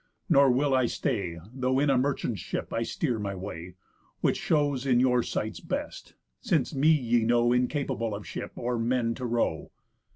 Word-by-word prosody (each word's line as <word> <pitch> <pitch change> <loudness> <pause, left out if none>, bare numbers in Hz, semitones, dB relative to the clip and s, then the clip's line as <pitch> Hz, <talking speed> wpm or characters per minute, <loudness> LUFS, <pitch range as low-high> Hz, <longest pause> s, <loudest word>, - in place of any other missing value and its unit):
Nor 140 0 +6
will 135 +3 +2
I 130 -2 +3
stay, 100 - -2 0.2
Though 130 0 0
in 140 +1 +3
a - - +3
merchant's 125 -6 -1
ship - - -5
I 115 - 0
steer 120 0 -1
my 100 -1 -3
way; 90 -2 -7 0.5
Which - - +2
shows 145 -4 +1
in 125 -2 +4
your 125 -1 +3
sights 110 -4 -3
best; - - -5 0.2
since 155 -5 0
me 145 +3 +3
ye 120 -7 +3
know 120 +1 +3
Incapable 125 -3 -1
of 100 - -8
ship, - - -6
or 120 0 -2
men 115 0 +1
to 125 +1 -4
row." 115 -9 -1
125 Hz, 175 wpm, -28 LUFS, 115-135 Hz, 0.5 s, Nor